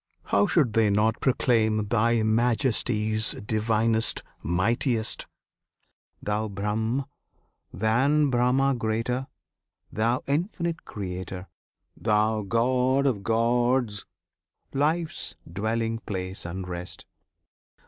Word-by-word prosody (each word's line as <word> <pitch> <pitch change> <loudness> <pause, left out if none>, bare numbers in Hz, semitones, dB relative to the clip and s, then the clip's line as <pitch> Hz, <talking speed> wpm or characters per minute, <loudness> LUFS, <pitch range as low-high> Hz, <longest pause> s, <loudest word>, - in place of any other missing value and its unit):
How 205 - +2
should 160 - +2
they 110 -2 +3
not 105 +2 +1
proclaim 110 -5 +2
Thy 115 +1 +2
Majesties, 110 -1 +1
Divinest, 110 +1 +1 0.2
Mightiest? 110 - 0 1.0
Thou 105 +1 -1
Brahm, 110 +6 -1 0.7
than 130 - +2
Brahma 125 +3 +3
greater! 120 +2 -1 0.6
Thou 115 +4 0
Infinite 170 +2 -2
Creator! 95 -1 -6 0.5
Thou 110 0 +1
God 125 +6 +2
of 120 -8 +1
gods, 115 0 +1 0.7
Life's 155 +4 -1
Dwelling 115 +5 -2
place 95 -4 -5
and 90 +2 -5
Rest! 90 0 -6
115 Hz, 85 wpm, -26 LUFS, 105-125 Hz, 1.0 s, they